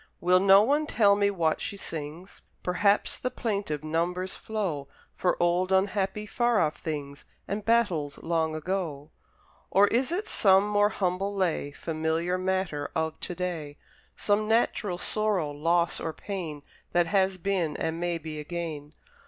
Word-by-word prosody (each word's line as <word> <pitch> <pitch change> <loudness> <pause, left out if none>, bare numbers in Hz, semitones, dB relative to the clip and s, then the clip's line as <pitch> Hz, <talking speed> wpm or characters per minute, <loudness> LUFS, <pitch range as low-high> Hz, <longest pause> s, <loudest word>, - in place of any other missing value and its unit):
Will 180 +1 +4
no 195 +1 +7
one 295 +6 +1
tell 205 -6 +4
me 200 0 +2
what 165 -5 0
she 200 - -4
sings? 160 +2 -7 0.2
Perhaps 200 +3 +2
the 255 - -1
plaintive 200 - -3
numbers 175 +4 -1
flow 185 -11 -3 0.3
For 180 - +1
old, 175 +2 +2
unhappy, 195 +2 +1
far 240 +1 +1
off 155 - +1
things, 145 -3 -5 0.2
And 205 +1 -3
battles 195 -11 +1
long 160 -1 -1
ago: 155 -3 -3 0.6
Or 200 +1 +6
is 255 +6 +1
it 390 +5 -2
some 195 0 +4
more 205 0 +3
humble 195 +1 -1
lay, 180 -6 0
Familiar 160 +4 -2
matter 185 -5 -1
of 160 0 -1
to 180 - -4
day? 165 -5 -4 0.4
Some 210 +1 +1
natural 215 -4 +1
sorrow, 200 -6 0
loss, 170 +4 +1
or 160 - -3
pain, 160 -5 -6 0.3
That 175 0 +4
has 190 +1 +1
been, 180 -5 -1
and 160 +1 -2
may 175 -1 -1
be 155 -1 -7
again? 155 -2 -5
180 Hz, 150 wpm, -27 LUFS, 160-200 Hz, 0.6 s, no